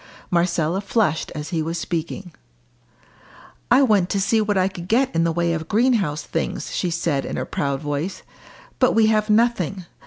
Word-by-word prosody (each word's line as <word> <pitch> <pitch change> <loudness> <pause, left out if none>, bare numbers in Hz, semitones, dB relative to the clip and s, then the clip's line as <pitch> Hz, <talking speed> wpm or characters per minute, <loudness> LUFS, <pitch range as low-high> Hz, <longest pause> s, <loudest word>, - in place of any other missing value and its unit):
Marcella 170 0 +1
flushed 200 -6 0
as 150 0 -5
he 165 -3 -1
was 165 +2 -3
speaking. 170 +2 -4 1.4
"I 255 +3 +6
went 205 -7 +3
to 200 - 0
see 220 +3 +2
what 205 -1 0
I 185 0 +3
could 175 -2 -7
get 250 +6 +2
in 165 0 +2
the 165 - +2
way 170 0 0
of 160 -1 -4
greenhouse 210 - +1
things," 165 - -3
she 180 - 0
said 165 -4 -1
in - - -4
a - - -1
sudden - - -7
proud 140 -1 -1
voice. 150 +5 -3 0.6
"But 255 - +4
we 225 -1 +5
have 215 0 +1
nothing. 210 -5 +1
180 Hz, 185 wpm, -22 LUFS, 165-215 Hz, 1.4 s, I